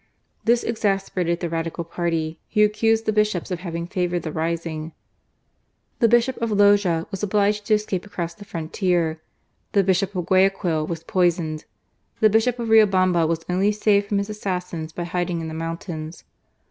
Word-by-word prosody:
This 235 Hz, +1 st, +3 dB
exasperated 195 Hz, -6 st, -1 dB
the 170 Hz, -, -2 dB
Radical 165 Hz, +1 st, -3 dB
party, 165 Hz, -1 st, -2 dB
who 210 Hz, -1 st, +5 dB
accused 225 Hz, +1 st, +1 dB
the 215 Hz, -, +1 dB
Bishops 210 Hz, -4 st, 0 dB
of 180 Hz, -, -2 dB
having 170 Hz, -2 st, -4 dB
favoured 175 Hz, -2 st, -2 dB
the 155 Hz, -, -4 dB
rising. 160 Hz, 0 st, -3 dB, 1.1 s
The 235 Hz, -, +5 dB
Bishop 240 Hz, +3 st, +3 dB
of 230 Hz, -, 0 dB
Loja 205 Hz, -5 st, +3 dB
was 195 Hz, -, -5 dB
obliged 210 Hz, 0 st, +1 dB
to 215 Hz, -, +5 dB
escape 205 Hz, -4 st, -2 dB
across 170 Hz, -5 st, -5 dB
the 205 Hz, -, -12 dB
frontier; 165 Hz, -2 st, -1 dB, 0.5 s
the 200 Hz, -, +4 dB
Bishop 190 Hz, +1 st, +1 dB
of 180 Hz, -2 st, -2 dB
Guayaquil 185 Hz, -4 st, +2 dB
was 165 Hz, -1 st, -5 dB
poisoned; 170 Hz, -4 st, 0 dB, 0.5 s
the 215 Hz, -1 st, +5 dB
Bishop 225 Hz, +3 st, +2 dB
of 235 Hz, -2 st, -3 dB
Riobamba 185 Hz, -6 st, +4 dB
was 165 Hz, 0 st, -2 dB
only 190 Hz, +3 st, +2 dB
saved 205 Hz, -1 st, +2 dB
from 205 Hz, -, 0 dB
his 200 Hz, +1 st, -2 dB
assassins 180 Hz, -6 st, -4 dB
by 175 Hz, -, -5 dB
hiding 175 Hz, 0 st, -2 dB
in 160 Hz, -1 st, -5 dB
the -, -, -7 dB
mountains. 165 Hz, 0 st, -6 dB
180 Hz, 165 wpm, -23 LUFS, 165-210 Hz, 1.1 s, who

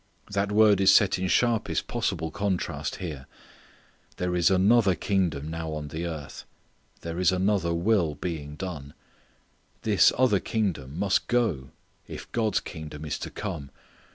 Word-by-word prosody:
That 100 Hz, 0 st, 0 dB
word 105 Hz, -2 st, +5 dB
is 95 Hz, 0 st, +7 dB
set 100 Hz, -3 st, +4 dB
in 95 Hz, -, -1 dB
sharpest 115 Hz, +3 st, +1 dB
possible 95 Hz, -9 st, -2 dB
contrast 100 Hz, +1 st, -2 dB
here. 75 Hz, -7 st, -7 dB, 0.9 s
There 90 Hz, 0 st, -1 dB
is 85 Hz, -1 st, +4 dB
another 95 Hz, +1 st, +4 dB
kingdom 85 Hz, -5 st, -1 dB
now 80 Hz, -1 st, -4 dB
on 75 Hz, -1 st, -5 dB
the 80 Hz, +4 st, -4 dB
earth. 75 Hz, -4 st, -7 dB, 0.6 s
There 85 Hz, +1 st, -5 dB
is 90 Hz, 0 st, +4 dB
another 95 Hz, -1 st, +1 dB
will 85 Hz, -4 st, +1 dB
being 75 Hz, -3 st, -5 dB
done. 75 Hz, -6 st, -7 dB, 0.9 s
This -, -, +5 dB
other 120 Hz, -6 st, +4 dB
kingdom 85 Hz, -11 st, -2 dB
must 95 Hz, 0 st, +1 dB
go 105 Hz, -, 0 dB, 0.4 s
if -, -, -9 dB
God's 110 Hz, -4 st, +1 dB
kingdom 80 Hz, -2 st, -8 dB
is 75 Hz, 0 st, -3 dB
to -, -, -5 dB
come. 85 Hz, -10 st, -5 dB
90 Hz, 145 wpm, -26 LUFS, 80-100 Hz, 0.9 s, is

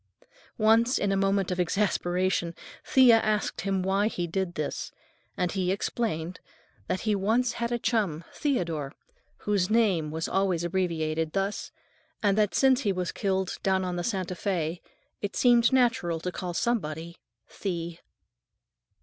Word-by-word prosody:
Once, 230 Hz, +3 st, +4 dB
in 200 Hz, -, 0 dB
a -, -, +2 dB
moment 195 Hz, -1 st, +1 dB
of 180 Hz, -, -2 dB
exasperation, 180 Hz, -2 st, 0 dB, 0.3 s
Thea 250 Hz, -4 st, +6 dB
asked 215 Hz, -1 st, -1 dB
him 195 Hz, 0 st, -1 dB
why 195 Hz, +2 st, +2 dB
he 175 Hz, -5 st, -2 dB
did 175 Hz, +1 st, -2 dB
this, 150 Hz, -1 st, -3 dB, 0.5 s
and 180 Hz, -1 st, 0 dB
he 185 Hz, -2 st, 0 dB
explained 185 Hz, -4 st, -2 dB, 0.5 s
that 185 Hz, -, -1 dB
he 215 Hz, -2 st, +1 dB
once 225 Hz, +5 st, +1 dB
had 235 Hz, 0 st, -3 dB
a 240 Hz, -, +1 dB
chum, 200 Hz, -10 st, 0 dB
Theodore, 165 Hz, -, -1 dB, 0.5 s
whose 200 Hz, -3 st, +1 dB
name 200 Hz, -9 st, +2 dB
was 160 Hz, +1 st, -3 dB
always 190 Hz, -3 st, +1 dB
abbreviated 165 Hz, -3 st, -1 dB
thus, 195 Hz, +1 st, -2 dB, 0.5 s
and 200 Hz, -2 st, +3 dB
that 210 Hz, -1 st, +1 dB
since 265 Hz, -1 st, +4 dB
he 205 Hz, -, +1 dB
was 180 Hz, -2 st, -2 dB
killed 190 Hz, -2 st, -1 dB
down 190 Hz, -1 st, +1 dB
on 180 Hz, -1 st, -2 dB
the 175 Hz, -, -2 dB
Santa 185 Hz, -5 st, -2 dB
Fé, 175 Hz, -3 st, -2 dB, 0.4 s
it 205 Hz, -, -4 dB
seemed 240 Hz, -2 st, +5 dB
natural 240 Hz, -10 st, +2 dB
to 180 Hz, -, -3 dB
call 180 Hz, -1 st, -5 dB
somebody 170 Hz, -7 st, -2 dB, 0.4 s
"Thee." 170 Hz, -3 st, -3 dB
190 Hz, 150 wpm, -27 LUFS, 175-215 Hz, 0.5 s, Thea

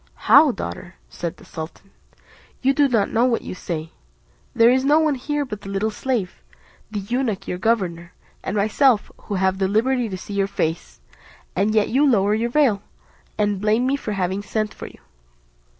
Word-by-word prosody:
"How, 295 Hz, +1 st, +7 dB
daughter!" 90 Hz, -, -7 dB, 0.2 s
said 170 Hz, 0 st, -5 dB
the -, -, -16 dB
sultan, 165 Hz, +4 st, -9 dB, 0.7 s
"you 270 Hz, +1 st, +4 dB
do 285 Hz, 0 st, +4 dB
not 225 Hz, -6 st, +1 dB
know 230 Hz, +2 st, +3 dB
what 240 Hz, -2 st, +1 dB
you -, -, -6 dB
say: 165 Hz, -3 st, -5 dB, 0.6 s
there 230 Hz, +1 st, +6 dB
is 260 Hz, +1 st, +2 dB
no 290 Hz, +3 st, +4 dB
one 315 Hz, -2 st, +3 dB
here, 290 Hz, +2 st, -2 dB
but 210 Hz, -5 st, -7 dB
the 195 Hz, -, -9 dB
little 200 Hz, +3 st, -1 dB
slave, 225 Hz, -, -3 dB, 0.5 s
the 210 Hz, -1 st, -4 dB
eunuch 230 Hz, 0 st, -2 dB
your 180 Hz, -, -3 dB
governor, 180 Hz, -6 st, -1 dB, 0.3 s
and 205 Hz, -, -2 dB
myself, 220 Hz, +3 st, +3 dB
who 205 Hz, -, -3 dB
have 190 Hz, 0 st, +1 dB
the 190 Hz, -, +2 dB
liberty 235 Hz, +4 st, +1 dB
to 190 Hz, -, -4 dB
see 205 Hz, -, -8 dB
your 200 Hz, -1 st, +1 dB
face; 165 Hz, -4 st, -3 dB, 0.5 s
and 210 Hz, +2 st, +1 dB
yet 215 Hz, -1 st, +3 dB
you 270 Hz, +5 st, +3 dB
lower 210 Hz, -7 st, +3 dB
your 230 Hz, +2 st, 0 dB
veil, 240 Hz, -7 st, +2 dB, 0.6 s
and 205 Hz, -2 st, 0 dB
blame 215 Hz, +4 st, +2 dB
me 270 Hz, +2 st, +2 dB
for 220 Hz, -6 st, -4 dB
having 190 Hz, 0 st, -1 dB
sent 215 Hz, +1 st, -2 dB
for -, -, -8 dB
you." -, -, -14 dB
210 Hz, 185 wpm, -22 LUFS, 195-250 Hz, 0.7 s, How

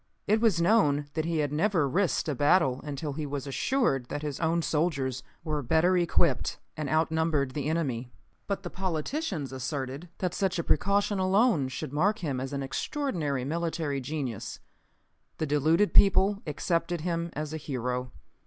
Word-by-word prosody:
It 215 Hz, +2 st, +2 dB
was 215 Hz, -7 st, +3 dB
known 170 Hz, -6 st, +3 dB
that 155 Hz, 0 st, -1 dB
he 165 Hz, -1 st, 0 dB
had 145 Hz, -, -5 dB
never 165 Hz, -2 st, +2 dB
risked 180 Hz, +5 st, +1 dB
a 150 Hz, -, 0 dB
battle 145 Hz, -1 st, +3 dB
until 145 Hz, 0 st, -4 dB
he 150 Hz, +1 st, -4 dB
was 140 Hz, -1 st, -4 dB
assured 140 Hz, -, 0 dB
that 145 Hz, +3 st, -4 dB
his 145 Hz, -2 st, -3 dB
own 165 Hz, 0 st, +1 dB
soldiers 140 Hz, -6 st, 0 dB, 0.2 s
were 155 Hz, -2 st, -1 dB
better 160 Hz, +8 st, +3 dB
equipped 170 Hz, -5 st, +1 dB, 0.2 s
and 150 Hz, -3 st, -3 dB
outnumbered 160 Hz, -3 st, +1 dB
the 145 Hz, +1 st, -2 dB
enemy. 130 Hz, -7 st, -1 dB, 0.4 s
But 200 Hz, -1 st, -2 dB
the 175 Hz, -, -6 dB
politicians 180 Hz, -, -2 dB
asserted 135 Hz, +4 st, -4 dB
that 180 Hz, -2 st, -1 dB
such 190 Hz, -3 st, 0 dB
a 170 Hz, -, -1 dB
precaution 200 Hz, +5 st, +2 dB
alone 190 Hz, -, +3 dB
should 130 Hz, +1 st, -5 dB
mark 200 Hz, +8 st, +2 dB
him 145 Hz, -9 st, -2 dB
as 130 Hz, +1 st, -4 dB
an 140 Hz, -1 st, -2 dB
extraordinary 145 Hz, -, -2 dB
military 160 Hz, -2 st, -2 dB
genius. 130 Hz, -5 st, -4 dB, 0.8 s
The 155 Hz, -, -1 dB
deluded 155 Hz, +7 st, +2 dB
people 200 Hz, +1 st, +5 dB
accepted 165 Hz, +3 st, -1 dB
him 170 Hz, 0 st, -1 dB
as 150 Hz, 0 st, -4 dB
a -, -, -2 dB
hero. 125 Hz, -4 st, -3 dB
155 Hz, 160 wpm, -28 LUFS, 140-180 Hz, 0.8 s, people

